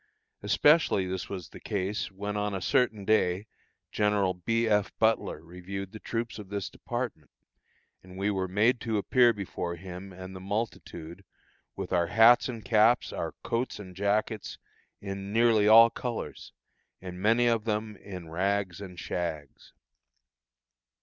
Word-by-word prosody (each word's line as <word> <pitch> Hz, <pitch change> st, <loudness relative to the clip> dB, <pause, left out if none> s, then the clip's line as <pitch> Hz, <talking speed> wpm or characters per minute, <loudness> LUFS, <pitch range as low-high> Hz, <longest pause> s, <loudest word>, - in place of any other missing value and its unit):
Especially 150 Hz, -, +4 dB
was 95 Hz, 0 st, -4 dB
this 95 Hz, -5 st, -6 dB
the -, -, -12 dB
case 100 Hz, +1 st, -2 dB
when 100 Hz, +2 st, -5 dB
on 105 Hz, -1 st, -1 dB
a -, -, -2 dB
certain 110 Hz, -2 st, +1 dB
day 100 Hz, -2 st, +2 dB, 0.5 s
General 105 Hz, -3 st, +2 dB
B. 115 Hz, +6 st, 0 dB
F. 105 Hz, -1 st, +2 dB
Butler 110 Hz, -8 st, +1 dB
reviewed 90 Hz, +3 st, -7 dB
the 110 Hz, -, -9 dB
troops 115 Hz, 0 st, -4 dB
of 100 Hz, -3 st, -10 dB
this 100 Hz, -1 st, -4 dB
department, 120 Hz, -, -5 dB, 0.7 s
and 90 Hz, 0 st, -13 dB
we 100 Hz, +2 st, 0 dB
were 95 Hz, -1 st, -1 dB
made 110 Hz, +7 st, +2 dB
to 110 Hz, -2 st, -1 dB
appear 120 Hz, +5 st, +4 dB
before 95 Hz, -4 st, -4 dB
him 90 Hz, +2 st, -9 dB
and 95 Hz, +1 st, -9 dB
the -, -, -7 dB
multitude 95 Hz, -4 st, -5 dB, 0.5 s
with -, -, -5 dB
our 85 Hz, -1 st, +2 dB
hats 115 Hz, +7 st, +6 dB
and 115 Hz, -5 st, -7 dB
caps, 115 Hz, +3 st, +3 dB
our -, -, -3 dB
coats 120 Hz, +2 st, -2 dB
and 95 Hz, -3 st, -10 dB
jackets, 105 Hz, +2 st, -1 dB, 0.4 s
in 100 Hz, 0 st, -6 dB
nearly 110 Hz, -2 st, +4 dB
all 115 Hz, +1 st, +8 dB
colors, 120 Hz, -2 st, -5 dB, 0.5 s
and 90 Hz, -1 st, -8 dB
many 115 Hz, +4 st, +3 dB
of 115 Hz, -2 st, +2 dB
them 110 Hz, -1 st, -2 dB
in 95 Hz, -4 st, -9 dB
rags 95 Hz, +2 st, -1 dB
and 90 Hz, -3 st, -9 dB
shags. 80 Hz, -5 st, -5 dB
100 Hz, 150 wpm, -28 LUFS, 95-110 Hz, 0.7 s, all